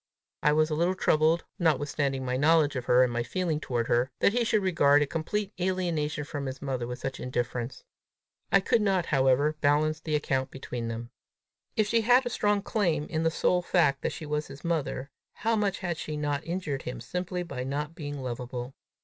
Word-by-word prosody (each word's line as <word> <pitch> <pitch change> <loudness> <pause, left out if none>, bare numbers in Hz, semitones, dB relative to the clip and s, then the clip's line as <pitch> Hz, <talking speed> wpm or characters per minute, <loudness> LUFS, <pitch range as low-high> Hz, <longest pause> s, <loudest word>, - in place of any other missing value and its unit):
I 150 - +4
was 155 +1 +2
a - - +1
little 170 +4 +1
troubled, 160 -1 +3 0.2
notwithstanding 145 -4 0
my 125 0 -1
knowledge 150 +1 +4
of 125 -1 -3
her 125 +1 +5
and 125 -1 0
my 120 - 0
feeling 160 +6 -1
toward 120 -5 -1
her, 120 +2 +2
that 200 - +3
he 245 0 +2
should 215 -3 +2
regard 145 -6 +4
a - - 0
complete 195 +7 -3
alienation 170 -5 -1
from 145 -1 -5
his 130 0 -5
mother 130 -4 -3
with 125 0 -5
such 135 +1 -5
indifference. 120 0 -3 0.7
I 195 - +6
could 225 +3 +2
not, 190 -4 +2
however, 140 +2 +2
balance 155 +2 +2
the 155 -1 -2
account 135 -3 0
between 125 -3 -5
them! 115 +1 -5 0.6
If 215 - +3
she 230 +2 +2
had 245 +3 +5
a 245 - -2
strong 205 -3 +1
claim 170 -10 0
in 160 -1 0
the 165 - +3
sole 180 +2 +1
fact 165 -6 +2
that - - -1
she 155 - -7
was 150 0 -2
his 140 - -11
mother, 150 -4 -2 0.2
how 225 +1 0
much 205 -3 0
had 175 -3 -2
she 155 -1 -4
not 145 +1 -2
injured 165 -6 -2
him 125 - -6
simply 180 0 -3
by 140 -7 -5
not 145 +4 -3
being 145 -4 -6
lovable! 125 +1 -5
150 Hz, 200 wpm, -28 LUFS, 135-175 Hz, 0.7 s, I